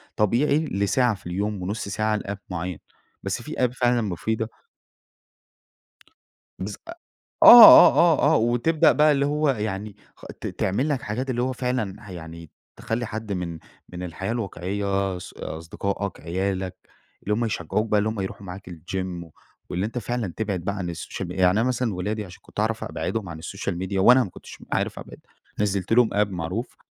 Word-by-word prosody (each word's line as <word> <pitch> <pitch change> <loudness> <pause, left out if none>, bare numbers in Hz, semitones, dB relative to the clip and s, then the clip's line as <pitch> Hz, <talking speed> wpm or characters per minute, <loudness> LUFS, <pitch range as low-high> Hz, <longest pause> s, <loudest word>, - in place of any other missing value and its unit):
طبيعي 140 +9 +2
لساعة 110 +2 +1
في 90 - -12
اليوم 100 +2 -2
ونص 100 +3 -4
ساعة 110 +1 0
لapp 100 0 -5
معين، 90 -2 -4 0.4
بس - - -3
في - - -9 0.2
app 120 - -10
فعلًا 120 -1 +2
مفيدة 110 +3 -2 2.1
بس - - -4
أ - - -6 0.5
آه، 240 -1 +12
آه، 160 -3 +4
آه، - - +5
وتبدأ 120 +8 +3
بقى 150 0 +4
اللي 140 -1 +2
هو 150 +1 +1
يعني 105 -4 -3 0.2
خ - - -15 0.2
ت - - -3
تعمل 125 +11 -1
لك 140 -4 -1
حاجات 125 +6 -4
اللي 120 -1 -1
هو 130 +1 -1
فعلًا 115 -6 -3
يعني 85 -2 -9 0.3
تخلي 115 +1 -3
حد 110 -1 -6
من 85 -3 -4 0.3
من 90 0 -7
الحياة 90 +4 -4
الواقعية 100 -3 -2
ص 90 - -10
أصدقائك، 95 +4 -5
عيالك، 95 +1 -2 0.5
اللي 105 - 0
هم 115 +3 0
يشجعوك 105 +1 -2
بقى 105 - +3
اللي 105 +1 +1
هم 110 -1 -4
يروحوا 95 +1 -6
معاك 90 +1 -9
الGym 90 +1 -5 0.4
واللي 90 +3 -1
أنت 115 +3 -5
فعلًا 120 -5 -3
تبعد 105 -4 -2
بقى 100 +4 -3
عن 90 -3 -3
الSocial 95 - -6
Media، 90 - -7
يعني 90 0 +6
أنا 115 - +2
مثلًا 125 -3 0
ولادي 105 +4 -3
عشان 90 -2 -13
كنت - - -9
أعرف 110 +1 -1
أبعدهم 110 -5 -4
عن 80 -1 -8
الSocial 100 +3 -4
Media 95 +1 -3
وأنا 125 +7 +6
ما 100 - -6
كنتش 90 - -12 0.2
عارف - - -1
أبعد، - - -11 0.4
نزّلت 100 -2 -1
لهم 120 -1 +5
app 105 0 +2
معروف 90 +6 -4
105 Hz, 175 wpm, -24 LUFS, 95-120 Hz, 2.1 s, آه